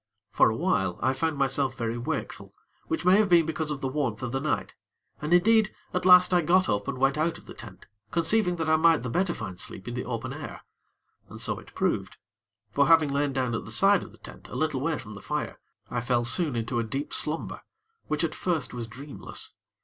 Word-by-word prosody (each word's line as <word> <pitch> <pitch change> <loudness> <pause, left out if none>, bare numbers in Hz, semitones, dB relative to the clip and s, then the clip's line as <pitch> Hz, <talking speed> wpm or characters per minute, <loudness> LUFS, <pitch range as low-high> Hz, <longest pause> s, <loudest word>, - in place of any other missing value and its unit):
For - - +4
a - - -2
while, - - 0
I 130 - +3
found 160 +2 -1
myself 135 -1 0
very 115 -1 -2
wakeful, 120 0 -5 0.3
which 325 - -2
may 185 +2 +6
have 210 -2 +3
been 170 -2 +5
because 160 -1 -2
of 145 -2 -3
the 135 - -1
warmth 130 -4 -2
of 125 - -3
the 135 - -1
night, 150 +2 -2 0.5
and, 150 +2 -3
indeed, 215 +4 +4 0.2
at 180 0 0
last 180 0 +7
I 175 - +5
got 185 +4 +3
up 105 +2 -1
and 140 -2 -3
went 135 +3 +2
out 165 +2 0
of - - -17
the - - -10
tent, - - -12 0.2
conceiving 180 +2 +2
that 160 -2 -3
I 160 0 +4
might 165 -3 +4
the 125 - -4
better 180 +2 0
find 95 -6 -7
sleep 95 - -5
in 120 - -4
the 125 - -4
open 125 +2 -4
air. 150 +1 -8 0.7
And - - -10
so - - -1
it - - -17
proved; - - -1 0.5
for, 140 +4 +3
having 160 -3 +5
lain 140 0 0
down 130 -3 -1
at 115 - -2
the - - -8
side 195 -1 +5
of - - -10
the - - -18
tent, - - -13
a - - -9
little 155 -4 -1
way 160 +1 0
from 105 - -9
the 105 - -10
fire, - - -4 0.3
I 120 - -1
fell 120 -1 0
soon 150 +2 +2
into 115 +1 -1
a - - 0
deep 135 +6 -4
slumber, 155 +2 0 0.5
which 155 +2 -1
at 160 -2 -1
first 170 -8 -2
was 120 -2 -5
dreamless. 135 +6 -6
145 Hz, 230 wpm, -27 LUFS, 125-170 Hz, 0.7 s, last